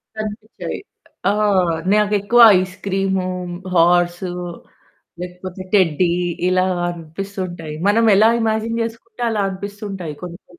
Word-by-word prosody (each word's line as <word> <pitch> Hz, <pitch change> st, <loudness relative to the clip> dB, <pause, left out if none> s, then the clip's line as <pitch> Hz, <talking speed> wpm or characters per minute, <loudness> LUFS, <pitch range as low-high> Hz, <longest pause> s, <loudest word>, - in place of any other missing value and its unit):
కనిపించాయి. 215 Hz, +1 st, -6 dB, 0.5 s
ఆ! -, -, +1 dB, 0.6 s
నాకెక్కువ 210 Hz, +2 st, +3 dB, 0.2 s
ice 185 Hz, 0 st, -4 dB
cream, 190 Hz, -1 st, 0 dB, 0.5 s
horse 175 Hz, +1 st, +3 dB, 1.0 s
లేకపోతే 180 Hz, +1 st, -7 dB
టెడ్డీ 175 Hz, -2 st, +3 dB, 0.4 s
ఇలా 185 Hz, 0 st, +2 dB, 0.2 s
అనిపిస్తుంటాయి. 175 Hz, -1 st, -6 dB
మనమెలా 215 Hz, 0 st, +5 dB
ఇమాజిన్ 225 Hz, +1 st, 0 dB
చేసుకుంటే 230 Hz, +1 st, -7 dB
అలా 215 Hz, -2 st, 0 dB
అనిపిస్తుంటాయి 195 Hz, -4 st, -6 dB
కొన్ని 175 Hz, -1 st, -7 dB
కొన్ని. -, -, -20 dB
195 Hz, 95 wpm, -19 LUFS, 180-210 Hz, 1.0 s, మనమెలా